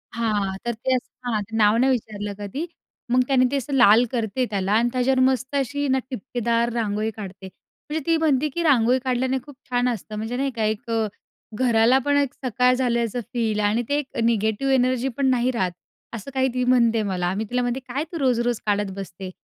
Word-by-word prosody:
हां. 210 -4 0
तर 240 - 0
ते 255 +4 -1
असं, 250 - -4 0.2
हां, 215 -2 0
ते 225 - -6
नाव 215 0 +4
नाही 260 +3 +3
विचारलं 210 -4 -3
कधी. 205 - -4 0.5
मग 255 +1 +5
त्याने 260 -2 +4
ते - - 0
असं 275 +1 -4
लाल 240 -2 +6
करते 230 +1 0
त्याला 195 -2 -1
आणि 235 +3 +3
त्याच्यावर 255 +1 +2
मस्त 260 +1 +1
अशी 280 +1 -1
ना 265 0 +2
ठिपकेदार 235 -1 -1
रांगोळी 215 -1 -1
काढते. 195 -2 -8 0.4
म्हणजे 310 +1 -1
ती 330 - +3
म्हणते, 305 -3 +2
की 340 +5 -3
"रांगोळी 255 -4 +4
काढल्याने 260 0 0
खूप 290 - -12
छान 245 0 +1
असतं." 215 -2 -5
म्हणजे 225 +3 -3
नाही 275 +1 0
का, 225 - -1
"एक 215 +1 -2 0.7
घराला 235 +1 +4
पण 285 0 +3
एक 280 -3 +1
सकाळ 250 +1 +3
झाल्याचं 235 -2 0
फील 225 -3 0
आणि 225 +4 +1
ते 285 - +2
एक 280 -2 -5
निगेटिव्ह 225 +3 +1
एनर्जी 255 0 +2
पण 280 - +1
नाही 250 0 +2
राहत," 190 -7 -1 0.4
असं 230 +4 -7
काही 265 -1 +2
ती 250 0 0
म्हणते 235 -3 +3
मला. 180 -1 -1
मी 210 - -1
तिला 250 0 0
म्हणते, 245 +1 -1
"काय 260 +2 -4
तू 340 - -4
रोज-रोज 245 -3 +1
काढत 205 -1 0
बसते." 190 -1 -7
245 Hz, 200 wpm, -23 LUFS, 220-260 Hz, 0.7 s, लाल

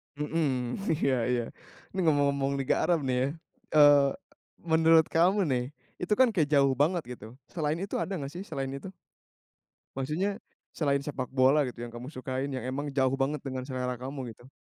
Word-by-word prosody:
Mmm, 145 -4 -1 0.2
iya 135 - +3
iya. 125 -1 +1 0.5
Ini 190 - -4
ngomong-ngomong 140 -2 +2
Liga 135 -1 0
Arab, 170 -5 +2
nih, 130 -1 0
ya. - - -2 0.5
Eee, 145 -2 +7 0.6
menurut 160 -1 +5
kamu, 185 +5 +3
nih. 125 -6 0 0.3
Itu, 180 +3 0
kan, 260 -1 +5
kayak 160 -7 +1
jauh 140 -1 +5
banget, 165 +4 +2
gitu. 110 +3 -12 0.2
Selain 155 -3 -1
itu 195 - -4
ada 195 - -2
nggak, 140 -3 -5
sih, 180 +3 -7
selain 135 -9 -4
itu? 140 +6 -7 1.1
Maksudnya, 150 +9 -1 0.5
selain 140 -3 +1
sepak 135 -4 -4
bola, 135 +3 +4
gitu, 120 - -8
yang 120 - -10
kamu 120 +3 -7
sukain 130 0 -4
yang 130 -2 -4
emang 140 +3 -3
jauh 135 -1 +2
banget 145 +3 0
dengan 130 -1 -4
selera 125 -1 -3
kamu, 130 -1 -6
gitu. 120 - -17
140 Hz, 170 wpm, -29 LUFS, 130-160 Hz, 1.1 s, Eee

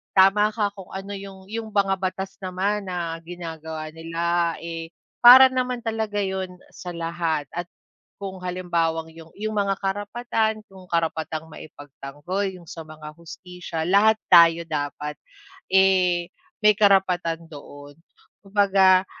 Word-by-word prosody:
tama 195 +2 +5
ka 205 -2 0
kung 195 -3 -11
ano 195 +1 -6
yung 195 -1 -11
yung 225 0 -4
mga 195 -1 +2
batas 190 +1 -4
naman 195 +2 -2
na 170 -2 -3
ginagawa 160 -2 -7
nila 170 +1 -1
eh, 165 -1 -6 0.3
para 255 +2 +10
naman 250 -1 -2
talaga 220 -2 -2
yun 190 -1 -3 0.2
sa 180 - -8
lahat 165 -3 -2
at 175 +1 -4 0.5
kung 190 -1 -6
halimbawang 170 -3 -2
yung 165 0 -13
yung 215 +1 -3
mga 195 -1 +1
karapatan 215 +2 -2
kung 190 -1 -14
karapatang 160 -1 -2
maipagtanggol 145 +7 -6
yung 180 -2 -13
sa 165 - -8
mga 155 -1 -10
hustisya 170 -1 -7
lahat 215 +3 +5
tayo 170 -1 +7
dapat, 150 0 -3 0.6
eh, 185 -2 +3 0.3
may 210 0 +7
karapatan 180 -5 +2
doon, 145 -1 -12 0.5
kumbaga 195 -2 +4
180 Hz, 130 wpm, -24 LUFS, 165-200 Hz, 0.6 s, para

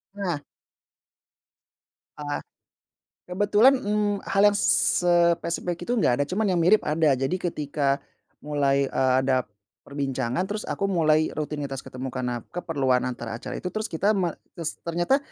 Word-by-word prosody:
Nah. 180 -7 -2 1.8
Ah. 145 -1 -4 0.9
Kebetulan, 205 +7 +4
mmm, 210 -4 -1
hal 195 - +1
yang - - -3
spesifik 175 -1 +2
itu 245 0 -1
enggak 125 - +3
ada, - - +1
cuman 215 +4 0
yang 185 -3 +1
mirip 195 +6 +6
ada, 155 0 +2
jadi 135 +5 -1 0.2
ketika 140 -2 -1 0.4
mulai, 140 -2 +1
eee, 130 -1 +1
ada 130 -1 +2 0.4
perbincangan 135 0 -2
terus 210 +2 -4
aku 195 - -1
mulai 155 -3 +3
rutinitas 145 -3 -4
ketemu 130 +1 -7
karena 125 -2 -3
keperluan 140 -8 0
antara 120 -2 -5
acara - - -7
itu, - - -8
terus 215 +2 -2
kita 195 +6 +1
me 185 -4 +1 0.2
terus 165 -2 -4
ternyata 175 +11 +2
160 Hz, 135 wpm, -25 LUFS, 140-195 Hz, 1.8 s, mirip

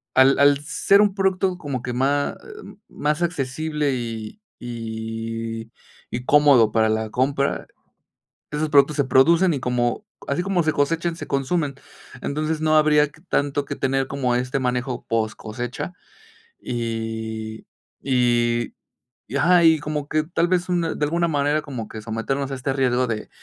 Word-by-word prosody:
al 130 +1 +5
al 140 0 +6
ser 195 +6 +3
un 205 -2 +2
producto 190 -1 +1
como 140 -7 -4
que 125 0 -4
má 140 +3 +1
eh, 430 -2 -11
más 150 +2 -1
accesible 150 -2 -1
y 115 - -5 0.2
y 115 -1 -5 0.4
y 125 +1 -5
cómodo 140 -7 +5
para 110 0 +3
la 110 0 -1
compra, 135 +4 0 0.9
esos 150 +1 -1
productos 145 0 +4
se 145 - +2
producen 165 +8 +4
y 140 - -3
como 125 - -1 0.2
así 140 +5 0
como 185 -2 +1
se 155 - +1
cosechan, 165 +4 0
se - - -7
consumen, 140 +1 -1 0.5
entonces, 155 +2 -2
no 155 0 +3
habría 150 -1 +4
que 150 - -20
tanto 145 -5 0
que - - -4
tener 135 0 0
como 130 -3 -1
este 125 +2 -1
manejo 125 0 -2
poscosecha 115 +5 -3 0.7
y 110 -2 -4 0.4
y 120 -2 +1 0.5
y - - -7
ajá. 175 +4 +5
Y 160 -1 +6
como 150 -1 -4
que, 155 0 +1
tal 170 +2 0
vez, 180 0 0
una 170 -2 0
de 150 - 0
alguna 170 +3 +1
manera 145 -1 +1
como 125 -7 -6
que 110 - -8
someternos 115 +5 -2
a - - -2
este 135 +1 -2
riesgo 130 -2 +2
de 110 -2 -4
140 Hz, 155 wpm, -23 LUFS, 120-155 Hz, 0.9 s, al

